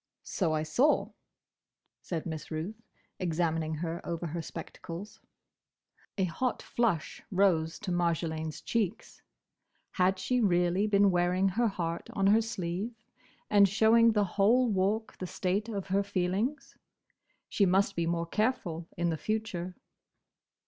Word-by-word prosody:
"So 175 -5 -1
I 155 0 0
saw," 250 - +2 0.9
said 165 -3 -4
Miss 160 -2 -5
Ruth, 175 +8 -5 0.4
examining 165 -2 0
her 165 +2 -4
over 170 0 -4
her 170 +1 -3
spectacles. 170 +4 -8 1.0
A 190 - +2
hot 240 +8 -1
flush 215 -10 -1
rose 180 -5 +2
to 205 -4 -3
Marjolaine's 160 -3 -1
cheeks. 220 -3 -2 0.7
Had 185 +1 +2
she 245 +7 0
really 180 0 +2
been 200 -1 +4
wearing 180 +2 +2
her 230 +5 +1
heart 170 -4 -3
on 195 - 0
her 210 +3 +5
sleeve, 200 +1 -3 0.5
and 200 -2 +5
showing 225 +3 +5
the 210 -1 +3
whole 215 +7 +3
Walk 205 +3 0
the 185 - -4
state 195 +5 -1
of 200 -4 -3
her 195 +2 +3
feelings? 200 +8 -2 0.7
She 200 - +2
must 195 +2 +2
be 170 -1 0
more 170 0 0
careful 175 -5 -1
in 170 -1 +1
future. 190 -3 -3
185 Hz, 130 wpm, -30 LUFS, 170-210 Hz, 1.0 s, her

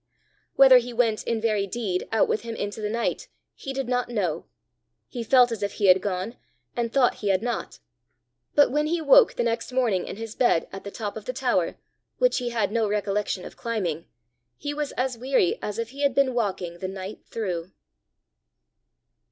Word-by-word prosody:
Whether 265 -2 +8
he 245 0 -6
went 230 -2 +1
in 230 -1 0
very 215 -3 0
deed 195 -4 -2
out 225 - +3
with - - 0
him 230 -1 -6
into 205 +1 -4
the 210 - -2
night, 230 +2 -2 0.3
he 270 - -7
did 270 -2 -3
not 245 -1 0
know 200 -9 -2 0.6
he 235 - -5
felt 245 +1 +5
as 225 -3 -4
if 200 - -2
he 205 - -1
had 185 +1 +6
gone, 195 +4 -3 0.4
and 235 -1 -1
thought 255 -2 +3
he 205 - -2
had 190 +2 +2
not 240 0 -3 0.8
but 290 - +5
when 300 +2 +1
he 340 +2 0
woke - - +6
the - - 0
next 230 +1 -2
morning 235 -8 +1
in - - -5
his 225 +1 -7
bed 240 -9 +2
at 195 - -8
the 200 - -6
top 205 0 -5
of - - -9
the - - -3
tower, - - 0 0.4
which - - +3
he 245 -1 -2
had 225 -4 0
no 225 -2 +1
recollection 205 -2 -1
of - - -10
climbing, 185 -9 -3 0.5
he 290 0 -4
was 295 -1 -3
as 255 -2 -2
weary 255 -8 +1
as 210 - -4
if 230 0 -3
he 280 +2 -8
had 280 -3 +2
been 275 -2 +3
walking 190 -7 -2
the 185 - -3
night 190 +2 -7
through. 185 -5 -4
230 Hz, 200 wpm, -25 LUFS, 200-250 Hz, 0.8 s, Whether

